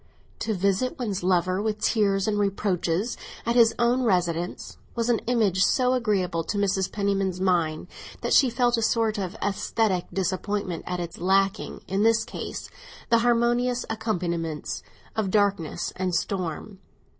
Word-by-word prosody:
To 220 - -1
visit 200 +6 0
one's 210 -6 -2
lover, 185 +1 +1
with 215 0 -1
tears 200 -3 +2
and 210 -1 +1
reproaches, 195 0 0 0.3
at 235 +1 +1
his 230 -2 +5
own 240 +2 +2
residence, 175 -6 -1 0.2
was 235 0 0
an 235 - +3
image 210 -6 +2
so 255 0 +3
agreeable 190 -9 0
to 205 - -3
Mrs. 195 -2 +1
Penniman's 195 -3 0
mind 170 -4 +1 0.4
that - - 0
she 265 - +6
felt 240 0 +2
a - - 0
sort 220 -1 +1
of 190 +1 -4
æsthetic 200 -1 0
disappointment 190 -1 -2
at 180 0 -2
its 170 -1 -6
lacking, 195 +3 +1
in 195 +2 0
this 225 0 +3
case, - - -6 0.4
the 230 - +6
harmonious 240 +1 +2
accompaniments 170 -8 -2 0.3
of 215 -3 0
darkness 200 -5 0
and 185 -2 -1
storm. 185 +1 -3
200 Hz, 145 wpm, -25 LUFS, 185-225 Hz, 0.4 s, she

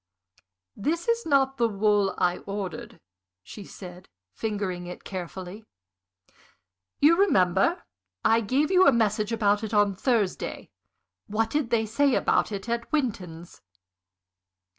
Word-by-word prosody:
"This 325 - -2
is 465 -3 0
not 270 -2 +2
the 235 -1 +2
wool 205 -1 +1
I 175 0 +1
ordered," 195 -2 -6 0.4
she 200 - -10
said, 180 -1 -11 0.2
fingering 200 -5 -3
it 180 - -9
carefully. 185 +2 -7 1.4
"You 305 +4 +6
remember, 235 - +2 0.4
I 225 +1 +4
gave 275 - 0
you 370 -3 +5
a - - +8
message 215 -2 0
about 210 -2 +1
it 220 0 -3
on 205 -1 +3
Thursday? 210 -1 -2 0.6
What 220 +2 -1
did 295 -5 -1
they 225 -2 +1
say 255 +5 +2
about - - +1
it 200 +1 -5
at 235 0 -3
Winton's?" 185 - -3
215 Hz, 125 wpm, -26 LUFS, 195-260 Hz, 1.4 s, a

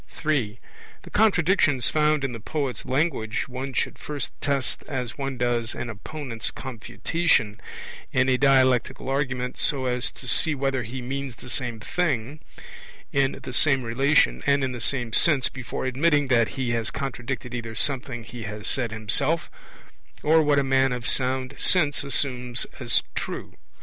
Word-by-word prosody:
(3) 135 -9 -1 0.5
The - - -12
contradictions 180 - +3
found 150 -1 +2
in 135 - -1
the 115 - -6
poet's 140 +2 -3
language 130 -6 0
one 130 +1 -5
should 125 - -1
first 150 -2 -3
test 140 -2 -1
as 125 -5 -3
one 135 -2 -4
does 120 -2 0
an 120 -1 -4
opponent's 120 +1 -4
confutation 115 - -1 0.5
in 130 0 +3
a 130 - +4
dialectical 130 -2 +3
argument, 130 -2 -1
so 135 -3 0
as 125 -1 0
to 130 - -11
see 155 +5 +2
whether 135 -1 0
he 125 +3 -6
means 135 0 -4
the 125 - -10
same 120 -4 -3
thing, 140 -1 -1 0.7
in 140 -1 +2
the 125 - -6
same 135 -1 +3
relation, 120 - +3
and 140 -1 +3
in 130 - 0
the 125 -2 -6
same 120 -3 -2
sense, 140 -2 +4
before 130 -1 -5
admitting 145 +2 +2
that 115 -3 +4
he 130 -2 0
has 115 0 -1
contradicted 130 -2 -4
either 115 -2 -5
something 125 -1 -1
he 120 +1 -9
has 105 0 -5
said 120 -4 0
himself 135 +9 +1 0.7
or 160 +1 +5
what 145 -2 +3
a 140 - +4
man 135 0 +3
of 125 -3 -3
sound 130 +2 +2
sense 150 -7 +3
assumes 125 -3 0
as - - +2
true. - - -5
130 Hz, 160 wpm, -25 LUFS, 120-140 Hz, 0.7 s, or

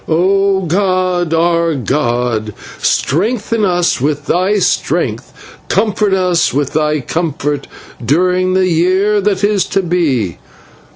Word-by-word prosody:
O 195 +4 +2
god, 185 -1 0
our 170 0 +1
god, 120 -5 -1 0.2
strengthen 220 - 0
us 175 -7 +1
with 145 +1 -1
thy 185 +6 +1
strength, 195 - -1 0.4
comfort 210 -2 +1
us 180 -3 +1
with 140 0 -2
thy 150 -1 0
comfort 145 -2 -3 0.4
during 180 +7 +1
the 190 - +3
day 185 +5 +2
that 200 -1 -1
is 205 -3 +2
to 195 - -1
be. 145 - -1
175 Hz, 115 wpm, -14 LUFS, 150-190 Hz, 0.4 s, the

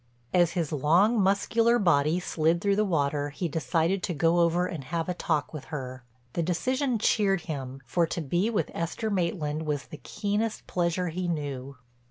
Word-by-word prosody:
As 175 -2 +4
his 170 -5 -1
long, 175 - +3
muscular 225 +5 +3
body 170 -5 +3
slid 165 -1 +1
through 200 +2 +2
the 210 - +2
water 145 -6 0
he 170 +5 -3
decided 165 +4 0
to 175 - -2
go 165 +3 +3
over 170 +1 +3
and 160 -7 -5
have 165 +2 -2
a 180 - 0
talk 155 -4 -1
with 150 -4 -7
her. 130 -3 -6 0.3
The 170 - 0
decision 255 - 0
cheered 200 -3 +2
him, 135 -4 -6
for 165 +7 +1
to 170 - -3
be 175 +8 0
with 225 - -1
Esther 190 +6 -3
Maitland 160 -5 -1
was 145 -3 -1
the 155 - -10
keenest 210 +6 -2
pleasure 175 0 0
he 180 +2 -3
knew. 140 -5 -4
170 Hz, 180 wpm, -27 LUFS, 150-195 Hz, 0.3 s, As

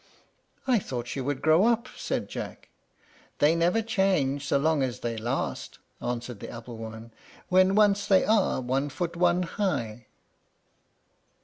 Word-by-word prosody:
"I 250 -4 +3
thought 125 -9 -5
she 135 - -4
would 135 +1 -3
grow 160 +4 +5
up," 235 +1 +1
said - - -3
Jack. - - -7 0.7
"They 150 +2 +4
never 175 +7 +2
change 180 -10 +1
so - - +3
long 155 +1 +2
as 125 -2 -2
they 115 -1 -2
last," 115 +2 -3 0.2
answered 120 -2 -4
the - - -8
apple 115 0 -9
woman, 110 0 -9 0.4
"when 185 +1 +4
once 205 -1 +3
they 190 -2 +4
are 215 -9 +2
one 135 +3 -1
foot 170 +3 -4
one 175 +1 +2
high." 125 - -3
145 Hz, 145 wpm, -27 LUFS, 120-190 Hz, 0.7 s, grow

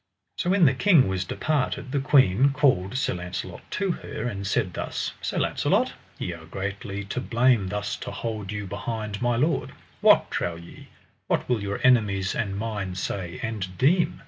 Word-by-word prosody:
So 175 - -1
when 190 -2 +5
the 135 - +5
king 160 - +5
was 95 -1 -1
departed 140 - -1
the 140 - +1
queen 135 -2 +4
called 130 -7 +2
Sir - - 0
Launcelot 90 0 -5
to 195 -2 0
her, 110 - -5
and 100 -5 -3
said 90 -2 0
thus: - - -3
Sir - - -3
Launcelot, - - +1 0.2
ye 90 - -3
are 80 -1 -11
greatly 100 +2 -4
to 100 +5 -4
blame 120 -4 +3
thus 105 +1 -2
to - - -6
hold 110 -4 -4
you 105 -1 -4
behind 105 +1 -4
my 120 -1 +2
lord; 150 +8 0 0.3
what, - - +5
trow 85 - -1
ye, 85 +1 -12 0.4
what - - 0
will 120 -4 +1
your 100 0 -3
enemies 105 -7 +3
and 100 -4 -2
mine 100 -4 -3
say 90 -1 -4
and 100 -5 -4
deem? 165 - +3
105 Hz, 175 wpm, -25 LUFS, 95-130 Hz, 0.4 s, when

